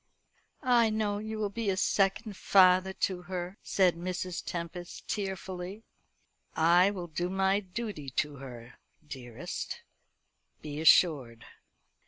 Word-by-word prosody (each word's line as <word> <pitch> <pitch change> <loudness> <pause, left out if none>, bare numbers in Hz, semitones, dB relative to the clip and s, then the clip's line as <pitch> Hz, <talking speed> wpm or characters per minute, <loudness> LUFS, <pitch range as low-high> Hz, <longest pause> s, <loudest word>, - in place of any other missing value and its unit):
"I 240 -3 +4
know 215 -1 -1
you 220 +1 -5
will 210 -2 -2
be 225 0 -2
a 190 - 0
second 195 +2 +1
father 185 0 +5
to 185 -1 -2
her," 180 +1 -5
said 185 -3 +3
Mrs. 180 +1 -4
Tempest 175 +1 -6
tearfully. 190 0 -4 0.7
"I 175 +4 +5
will 190 -4 -5
do 175 +2 -3
my 190 +1 +2
duty 190 - -6
to 145 +2 -2
her, 125 -3 -11 0.3
dearest, 125 -5 -6 0.8
be 150 0 -6
assured." 140 -8 +4
185 Hz, 120 wpm, -30 LUFS, 170-200 Hz, 0.8 s, father